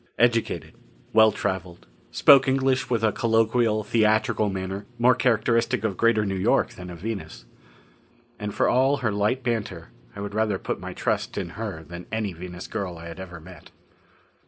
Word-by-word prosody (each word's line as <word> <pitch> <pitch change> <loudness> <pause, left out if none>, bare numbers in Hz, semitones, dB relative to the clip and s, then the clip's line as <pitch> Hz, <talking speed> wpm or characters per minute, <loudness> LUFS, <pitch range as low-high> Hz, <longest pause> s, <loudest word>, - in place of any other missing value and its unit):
Educated. 115 -1 +1 0.4
Well 110 0 +6
traveled. 95 -4 -4 0.2
Spoke 140 - +6
English 130 -1 +1
with 115 -3 0
a 110 - +4
colloquial, 115 -1 +2
theatrical 110 0 +2
manner 95 +1 -5
more 125 +2 +5
characteristic 120 -1 +1
of 105 -4 -1
Greater 110 0 +2
New 100 - -2
York 95 -1 +1
than 90 0 -10
of 90 - -8
Venus. 85 - -6 0.9
And 105 -1 -4
for - - +1
all 135 +3 +3
her 110 - +2
light 105 +6 0
banter, 105 -8 -3 0.3
I - - -8
would 100 0 -5
rather 105 -2 +1
put - - -4
my - - -7
trust - - -2
in - - -3
her 95 -4 -6
than 85 +2 -10
any 110 -4 -2
Venus 90 +1 -8
girl 95 -5 -4
I 85 +1 -9
had 85 - -9
ever 90 -3 -8
met. 90 +1 -14
105 Hz, 170 wpm, -25 LUFS, 95-115 Hz, 0.9 s, Well